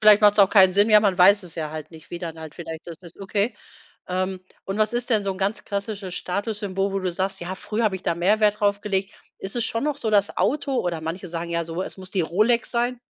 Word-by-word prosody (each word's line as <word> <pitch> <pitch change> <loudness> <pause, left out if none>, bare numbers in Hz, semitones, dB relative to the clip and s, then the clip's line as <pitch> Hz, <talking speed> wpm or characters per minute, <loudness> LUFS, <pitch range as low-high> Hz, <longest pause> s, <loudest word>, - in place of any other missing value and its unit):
Vielleicht 210 -1 +7
macht's 210 0 +5
auch 200 -2 +7
keinen 190 -3 +6
Sinn, 205 +3 +4
ja, 210 0 +8
man 195 -3 +1
weiß 200 +3 +6
es 175 -3 -9
ja 155 -2 -3
halt 155 -1 -7
nicht, 160 -2 -15
wie 175 - -5
dann 165 -2 -6
halt 160 -2 -9
vielleicht 160 -2 -8
das 170 -2 -8
ist. 170 -2 -12
Okay. 200 +3 -1 0.5
Ähm, 185 +1 -2 0.2
und 195 +2 -4
was 215 0 +2
ist 240 +1 -2
denn 215 -3 +2
so 195 - 0
'n 185 - -10
ganz 200 +2 -1
klassisches 200 -2 -4
Statussymbol, 200 0 -2
wo 195 - 0
du 185 -1 -1
sagst: 190 +2 -2
„Ja, 175 +2 -4
früher 220 +4 -2
habe 200 -3 +1
ich 185 - -12
da 170 - 0
mehr 185 +6 +2
Wert 210 -1 +3
draufgelegt?“ 200 -1 0 0.3
Ist 195 +4 -6
es 235 - +1
schon 230 - -2
noch 300 -1 0
so 225 -6 -2
das 205 -1 +2
Auto? 270 +8 0
Oder, 170 -3 -2
manche 165 +4 -5
sagen 170 0 -5
ja 170 0 -1
so, 165 +3 -4
es - - -7
muss 185 -1 -10
die 195 - +1
Rolex 215 +8 +1
sein. 245 +1 -1
195 Hz, 260 wpm, -24 LUFS, 175-210 Hz, 0.5 s, ja